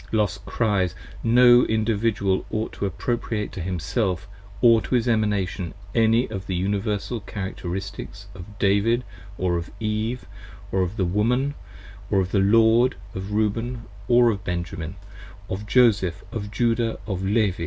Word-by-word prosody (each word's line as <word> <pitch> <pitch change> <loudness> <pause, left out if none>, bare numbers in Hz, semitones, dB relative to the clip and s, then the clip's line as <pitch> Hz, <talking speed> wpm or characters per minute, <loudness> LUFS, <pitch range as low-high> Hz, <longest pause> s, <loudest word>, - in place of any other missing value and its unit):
Los 105 -4 +1
cries: 95 -6 0 0.3
No 120 +1 +7
Individual 105 -3 +1
ought 110 +1 -3
to 100 - -2
appropriate 110 +2 -2
to 95 - -6
Himself 90 - -2 0.3
Or 115 -2 +6
to 125 - -1
his 120 0 +1
Emanation, 105 -5 0 0.2
any 115 +2 +3
of 95 -3 -6
the 95 - -2
Universal 100 +5 -1
Characteristics 100 0 -6
30 95 - -12
Of 100 +4 -11
David 105 +5 +2 0.3
or 90 -1 0
of 85 +1 -5
Eve, 110 +3 -2 0.5
of 95 +1 0
the 95 - +1
Woman, 120 +10 +1 0.6
or 100 - +3
of 95 0 -1
the 100 - +2
Lord, 115 +5 +4 0.2
Of 95 +2 -5
Reuben 115 +3 -1 0.2
or 120 -1 +5
of 100 -2 -5
Benjamin, 85 -1 -4 0.5
of 105 +2 -5
Joseph 100 -7 +3
or 115 - -2
Judah 115 0 +1
or 95 -4 -2
Levi. 100 -1 +1
105 Hz, 145 wpm, -24 LUFS, 95-115 Hz, 0.6 s, No